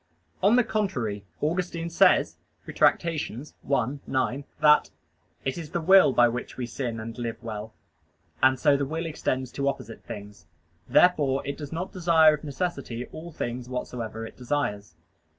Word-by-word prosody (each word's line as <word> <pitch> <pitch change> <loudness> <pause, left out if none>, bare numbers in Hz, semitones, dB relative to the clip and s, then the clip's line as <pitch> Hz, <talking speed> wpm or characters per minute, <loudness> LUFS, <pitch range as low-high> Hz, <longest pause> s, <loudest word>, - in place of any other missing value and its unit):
On 205 +5 +5
the 250 - +5
contrary, 120 - -2 0.2
Augustine 170 +1 -2
says 170 - +4 0.3
(Retract. - - +3
i, 165 -2 -1 0.9
9) 130 +1 -1 0.2
that 150 0 +5 0.6
"it 135 +5 -2
is 160 -3 -7
the 170 - -2
will 190 -1 +6
by 120 -1 +5
which 120 +1 -5
we 125 - -2
sin 120 -1 -4
and 110 +1 -6
live 115 -1 -3
well," 110 -1 -6 0.7
and 130 -1 +4
so 145 -2 +4
the 140 -1 -1
will 165 +3 -3
extends 130 -5 -2
to 140 0 -2
opposite 115 -5 -4
things. 100 -5 -10 0.4
Therefore 145 -7 +4
it 140 0 -3
does 145 -2 -8
not 175 +3 -4
desire 165 -3 +5
of 150 - -5
necessity 140 -5 -3
all 170 +2 -8
things 125 -4 -5
whatsoever 115 -3 -5
it - - -11
desires. 120 - -3
140 Hz, 155 wpm, -26 LUFS, 120-165 Hz, 0.9 s, will